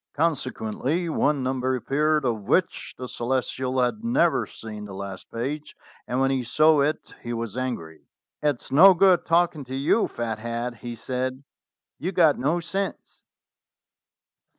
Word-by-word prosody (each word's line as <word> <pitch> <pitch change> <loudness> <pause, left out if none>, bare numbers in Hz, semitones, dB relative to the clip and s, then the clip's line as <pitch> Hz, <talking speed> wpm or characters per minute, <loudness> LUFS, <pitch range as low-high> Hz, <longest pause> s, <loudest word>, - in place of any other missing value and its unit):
Consequently 145 +1 -1
one 145 -3 +1
number 130 0 0
appeared 150 +4 +1
of 115 -4 0
which 185 - 0
the 130 - -6
Ce - - -10
lestial 130 +1 0
had 215 - -4
never 235 -8 +2
seen 105 -2 -8
the 100 -2 -9
last 95 -1 -7
page, 145 +6 -4 0.3
and 125 - -1
when 135 0 +2
he 135 -1 +1
saw 155 +5 +4
it 150 +2 -1
he 120 - -4
was 115 -2 -4
angry. 120 -12 -5 0.3
"It's 145 -4 -1
no 185 +7 +8
good 185 0 +4
talking 165 -2 +2
to 130 +1 -6
you, 140 +11 +2
Fat 115 -2 -4
head," 120 +1 -4
he 120 -1 -7
said; 130 +3 -3 0.6
"you've 180 +4 -3
got 160 -5 +4
no 150 +7 +1
sense. 190 +4 -5
130 Hz, 150 wpm, -25 LUFS, 120-155 Hz, 0.6 s, no